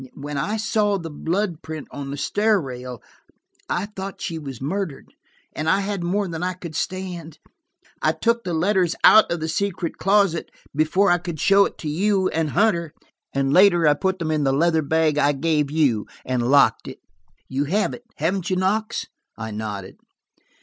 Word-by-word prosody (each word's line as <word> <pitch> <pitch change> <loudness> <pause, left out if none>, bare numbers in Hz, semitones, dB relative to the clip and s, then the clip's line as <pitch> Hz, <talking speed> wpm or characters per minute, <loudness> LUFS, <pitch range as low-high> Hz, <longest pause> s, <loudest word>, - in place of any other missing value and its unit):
When 145 +1 -6
I 205 +11 -1
saw 210 -2 +1
the 165 -3 -7
blood 175 +3 -2
print 160 -2 -7
on 140 -1 -6
the 140 - -5
stair 210 +7 +2
rail, 125 -5 -7 0.7
I 180 - 0
thought 195 -2 -7
she 165 -1 -4
was 135 -5 -7
murdered, 165 +2 -4 0.4
and 155 +1 -2
I 190 +4 +3
had 200 -2 -3
more 195 +3 0
than 165 -2 -5
I 180 +1 -1
could 170 -3 -9
stand. 175 -3 -4 0.6
I - - +3
took 235 0 0
the 175 -2 -2
letters 180 0 +2
out 215 - +8
of 170 -2 -2
the 160 - -2
secret 175 0 -2
closet, 195 -4 +2 0.3
before 175 +6 +3
I 175 - +3
could 170 -2 -6
show 200 +4 +5
it - - -6
to 155 - -6
you 190 +4 +1
and 160 -1 -1
Hunter, 170 -5 +1 0.4
and 135 0 0
later 175 -3 +6
I 150 - +6
put 190 +5 -1
them 165 -3 -2
in 155 -2 +1
the 135 - +2
leather 160 +3 +2
bag 155 0 +1
I 145 0 +3
gave 150 0 0
you, 140 -9 +1 0.2
and 125 -1 -1
locked 140 0 +4
it. - - -8 0.5
You 135 +2 -1
have 205 +8 0
it, 240 - -10
haven't 180 +4 -1
you, 185 - +1
Knox?" 215 +5 0 0.3
I 110 -1 -5
nodded. 105 -3 -6
165 Hz, 185 wpm, -22 LUFS, 145-195 Hz, 0.7 s, out